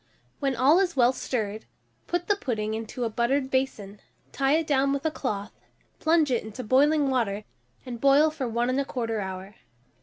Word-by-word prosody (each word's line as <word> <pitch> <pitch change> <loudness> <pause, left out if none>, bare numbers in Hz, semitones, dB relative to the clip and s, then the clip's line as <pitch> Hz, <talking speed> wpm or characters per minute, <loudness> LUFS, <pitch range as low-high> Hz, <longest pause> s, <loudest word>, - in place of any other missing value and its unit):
When 275 -2 0
all 280 +8 +5
is 365 -4 0
well 250 -1 +4
stirred, 220 -5 -3 0.4
put 350 0 -1
the 410 - +2
pudding 220 - -3
into 225 +3 -4
a 230 - 0
buttered 260 +4 0
basin, 215 -7 -2 0.3
tie 275 0 +1
it 325 0 +1
down 275 -2 +2
with 280 +1 -3
a 315 - +2
cloth, 215 -8 -4 0.5
plunge 315 -3 +3
it 240 - +1
into 220 +4 -7
boiling 280 +4 +3
water, 215 -5 0 0.4
and 240 -3 -7
boil 280 +3 +5
for 290 -5 -4
1 235 +1 0
1/4 250 -4 -1
hour. 190 +2 -7
260 Hz, 175 wpm, -26 LUFS, 220-280 Hz, 0.5 s, all